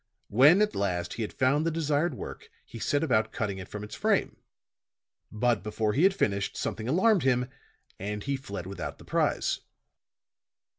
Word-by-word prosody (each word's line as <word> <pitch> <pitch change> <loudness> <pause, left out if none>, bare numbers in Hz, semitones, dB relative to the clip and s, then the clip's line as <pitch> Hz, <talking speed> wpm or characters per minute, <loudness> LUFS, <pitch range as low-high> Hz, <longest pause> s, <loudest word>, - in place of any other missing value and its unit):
When, 150 - +6
at 210 - -1
last, 90 -3 -1
he - - -5
had 110 - -3
found 135 +4 +2
the 165 - +1
desired 155 -1 0
work, - - -8 0.2
he 115 - -10
set 145 +6 +1
about 110 -8 +2
cutting 100 -3 -3
it 95 - -8
from 105 0 -7
its 105 - -9
frame. - - +1 1.0
But, 115 0 +1
before 105 0 -1
he 140 - +1
had 190 +2 +5
finished, 100 - 0
something 110 0 -3
alarmed 190 - +4
him, 125 -1 +1 0.5
and 105 +1 -4
he 140 0 -1
fled 100 -9 -6
without 100 +1 -6
the - - -15
prize." - - 0
120 Hz, 170 wpm, -28 LUFS, 105-150 Hz, 1.0 s, When